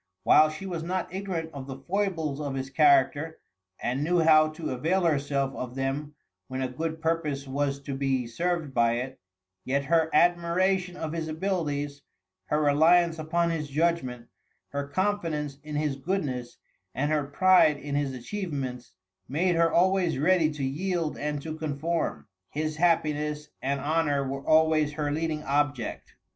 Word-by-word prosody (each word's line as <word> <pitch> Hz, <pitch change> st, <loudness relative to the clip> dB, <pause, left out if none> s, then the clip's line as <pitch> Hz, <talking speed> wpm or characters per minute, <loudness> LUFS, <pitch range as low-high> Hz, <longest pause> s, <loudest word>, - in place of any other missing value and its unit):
While 155 Hz, 0 st, +6 dB
she 155 Hz, +5 st, -7 dB
was 175 Hz, -4 st, -3 dB
not 180 Hz, +2 st, -3 dB
ignorant 185 Hz, -4 st, -3 dB
of 140 Hz, -1 st, -7 dB
the 135 Hz, -1 st, -6 dB
foibles 165 Hz, -3 st, -2 dB
of 140 Hz, -2 st, -3 dB
his 130 Hz, 0 st, -4 dB
character, 145 Hz, +2 st, +3 dB, 0.4 s
and 130 Hz, +4 st, -1 dB
knew 175 Hz, +2 st, +2 dB
how 155 Hz, -1 st, +6 dB
to 155 Hz, +1 st, -5 dB
avail 165 Hz, +9 st, 0 dB
herself 140 Hz, -4 st, +1 dB
of 125 Hz, 0 st, -6 dB
them 140 Hz, +3 st, -3 dB, 0.3 s
when 130 Hz, -, -4 dB
a -, -, 0 dB
good 160 Hz, +5 st, -4 dB
purpose 155 Hz, -4 st, -1 dB
was 140 Hz, +1 st, -1 dB
to 140 Hz, 0 st, -5 dB
be 135 Hz, -2 st, 0 dB
served 165 Hz, +4 st, -2 dB
by 115 Hz, -1 st, +3 dB
it, 130 Hz, +2 st, -4 dB, 0.4 s
yet 140 Hz, +2 st, 0 dB
her 160 Hz, +1 st, +3 dB
admiration 175 Hz, +1 st, +2 dB
of 160 Hz, -2 st, -4 dB
his 165 Hz, -1 st, -3 dB
abilities, 155 Hz, -4 st, -2 dB, 0.4 s
her 150 Hz, -, 0 dB
reliance 160 Hz, +3 st, +4 dB
upon 170 Hz, +2 st, 0 dB
his 150 Hz, -3 st, -3 dB
judgment, 135 Hz, -6 st, 0 dB, 0.4 s
her 140 Hz, 0 st, -3 dB
confidence 155 Hz, -5 st, -1 dB
in 150 Hz, 0 st, -7 dB
his 150 Hz, -2 st, -1 dB
goodness, 135 Hz, -7 st, -3 dB, 0.4 s
and 145 Hz, +4 st, 0 dB
her 150 Hz, -2 st, +1 dB
pride 180 Hz, 0 st, +4 dB
in 145 Hz, 0 st, -6 dB
his 145 Hz, -1 st, 0 dB
achievements, 130 Hz, -, -5 dB, 0.4 s
made 175 Hz, +7 st, +1 dB
her 165 Hz, 0 st, +3 dB
always 180 Hz, -2 st, +2 dB
ready 165 Hz, +2 st, +3 dB
to 145 Hz, -2 st, -5 dB
yield 165 Hz, +3 st, -1 dB
and 150 Hz, -1 st, -3 dB
to 155 Hz, -1 st, -5 dB
conform. 160 Hz, +2 st, -2 dB, 0.2 s
His 155 Hz, +1 st, -3 dB
happiness 150 Hz, -3 st, +1 dB
and 140 Hz, +1 st, -1 dB
honor 145 Hz, -1 st, +1 dB
were 135 Hz, +1 st, -4 dB
always 155 Hz, -1 st, +3 dB
her 150 Hz, -1 st, -2 dB
leading 155 Hz, 0 st, -2 dB
object. 145 Hz, -4 st, -1 dB
150 Hz, 155 wpm, -27 LUFS, 140-165 Hz, 0.4 s, While